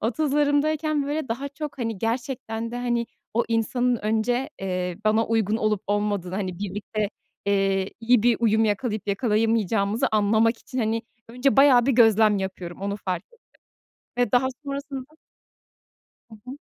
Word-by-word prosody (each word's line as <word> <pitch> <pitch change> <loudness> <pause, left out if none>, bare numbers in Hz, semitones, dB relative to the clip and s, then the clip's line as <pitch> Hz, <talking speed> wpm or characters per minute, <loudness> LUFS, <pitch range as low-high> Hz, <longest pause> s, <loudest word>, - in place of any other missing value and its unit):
30'larımdayken 295 +3 +1
böyle, 295 -2 -2
daha 265 +5 -3
çok, 285 0 -7
hani, 225 -4 -3
gerçekten 230 -1 -3
de, 245 - -5
hani, 240 -1 -1 0.3
o 235 - +2
insanın 240 +2 +1
önce, 225 +6 0
eee, 180 -2 -3
bana 220 +1 +3
uygun 220 -1 +1
olup 215 -3 0
olmadığını, 205 -3 -1
hani, 185 -3 -3
birlikte, 205 +1 -3 0.4
eee, 195 -1 +1
iyi 235 -1 +4
bir 240 -1 +4
uyum 220 -1 +3
yakalayıp 210 -1 -1
yakalayamayacağımızı 215 -1 +1
anlamak 220 +2 +3
için, 260 - -7
hani, 225 0 0 0.3
önce 250 +3 +1
bayağı 265 -3 +6
bir 275 - +3
gözlem 220 -3 +5
yapıyorum, 185 -2 -6
onu 200 +1 -2
fark 185 -2 -3
ettim 475 - -22 0.8
ve 245 - +1
daha 250 +1 +3 0.2
sonrasında 280 -1 -4 1.3
Hı - - -11
hı. 260 +3 -8
225 Hz, 145 wpm, -24 LUFS, 205-250 Hz, 1.3 s, bayağı